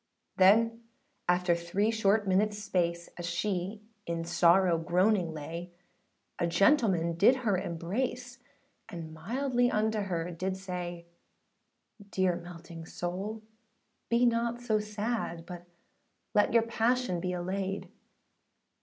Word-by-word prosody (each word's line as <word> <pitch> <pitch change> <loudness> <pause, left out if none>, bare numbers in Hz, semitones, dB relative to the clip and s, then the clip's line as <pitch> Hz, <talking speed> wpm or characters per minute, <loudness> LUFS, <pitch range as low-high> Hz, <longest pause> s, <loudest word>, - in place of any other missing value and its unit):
â - - -44
Then 230 +4 +5 0.5
after 180 0 +3
three 180 +6 0
short 215 -1 +2
minutesâ 205 +3 +2
space, 170 -4 -1
As 175 0 -3
she 190 +3 -2 0.2
in 165 0 -2
sorrow 175 0 +4
groaning 180 +1 +2
lay, 165 +3 -7 0.7
A 170 - +1
gentleman 195 - +3
{108b} - - -9
did 240 +7 +6
her 205 -3 +3
embrace, 240 +9 -3 0.5
And 165 -5 -7
mildly 245 - 0
unto 220 0 +1
her 175 -4 -2
did 185 +3 -3
say, 175 -2 -5 1.0
âDear 185 -3 0
melting 170 -1 -10
soul 195 +5 -4 0.7
be 235 +1 +4
not 235 0 +1
so 220 -3 +1
sad, 210 -5 -3
But 175 -1 -9 0.7
let 205 - +4
your 230 -1 +5
passion 230 -3 0
be 180 +1 -2
allayed. 190 +2 -3
190 Hz, 120 wpm, -30 LUFS, 175-220 Hz, 1.0 s, did